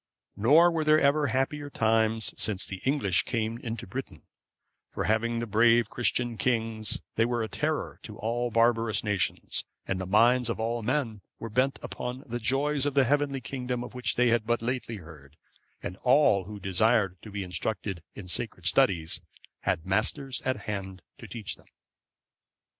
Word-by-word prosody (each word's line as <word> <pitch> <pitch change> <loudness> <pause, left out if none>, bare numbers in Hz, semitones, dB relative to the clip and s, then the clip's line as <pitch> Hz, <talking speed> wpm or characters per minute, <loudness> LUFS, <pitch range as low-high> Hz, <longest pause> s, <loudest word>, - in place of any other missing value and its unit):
Nor 150 - +6
were 165 -2 0
there 155 0 +5
ever 145 +1 +3
happier 140 +3 -1
times 110 -2 +1
since 100 -3 0
the 95 -1 -6
English 130 -10 +2
came 115 0 -2
into 115 -3 -5
Britain; 130 +7 -7 0.7
for - - -3
having 110 +4 +1
brave 115 +1 +4
Christian 120 -1 0
kings, 115 -4 0 0.2
they 115 - +5
were 120 0 0
a - - -2
terror 150 - -2
to 105 -1 -9
all 120 +2 -1
barbarous 115 -1 +2
nations, 100 -6 0 0.2
and 95 - -1
the 95 - -4
minds 120 +5 +4
of 115 - -2
all 115 +1 -1
men 115 -3 -1 0.2
were 115 - -7
bent 130 +4 +2
upon 125 +2 -5
the 120 -1 -4
joys 140 +4 +1
of 145 - -2
the 140 - +6
heavenly 140 0 +1
kingdom 125 0 -3
of 125 - -9
which 125 -3 -1
they 125 0 +4
had 115 -2 +1
but 120 -1 +1
lately 125 -1 -2
heard; 80 -6 -13 0.5
and 90 - -5
all 125 -8 +4
who 105 +1 -8
desired 100 -1 +1
to 110 - -10
be 100 -1 -4
instructed 95 0 -3
in 95 - -8
sacred 95 -2 -3
studies 90 -9 +2 0.4
had 80 - -1
masters 115 +7 -1
at 130 0 -1
hand 95 -3 -5 0.2
to - - -9
teach 110 -5 -5
them. - - -23
115 Hz, 170 wpm, -28 LUFS, 105-130 Hz, 0.7 s, Nor